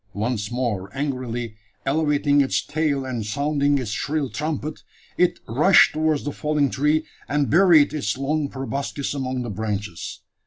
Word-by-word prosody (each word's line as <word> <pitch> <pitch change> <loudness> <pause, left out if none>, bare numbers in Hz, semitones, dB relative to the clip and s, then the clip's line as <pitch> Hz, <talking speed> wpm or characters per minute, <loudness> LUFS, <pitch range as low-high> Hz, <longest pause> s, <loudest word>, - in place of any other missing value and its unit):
Once 105 0 -2
more 115 -6 -2
angrily 125 -5 -3 0.3
elevating 145 0 +2
its 135 - 0
tail, 150 -3 0
and 125 -4 -3
sounding 145 +5 +1
its 125 -6 -3
shrill 140 +8 -1
trumpet, 155 0 -3 0.3
it 180 - +2
rushed 150 - +5
towards 155 -1 +1
the 145 - -3
fallen 150 -2 0
tree, 150 +3 +1 0.2
and 145 -4 +1
buried 170 -4 +6
its 130 -8 -1
long 145 +2 -1
proboscis 140 +1 -3
among 130 -2 -2
the 120 - -5
branches. 105 -3 -4
140 Hz, 145 wpm, -23 LUFS, 120-150 Hz, 0.3 s, buried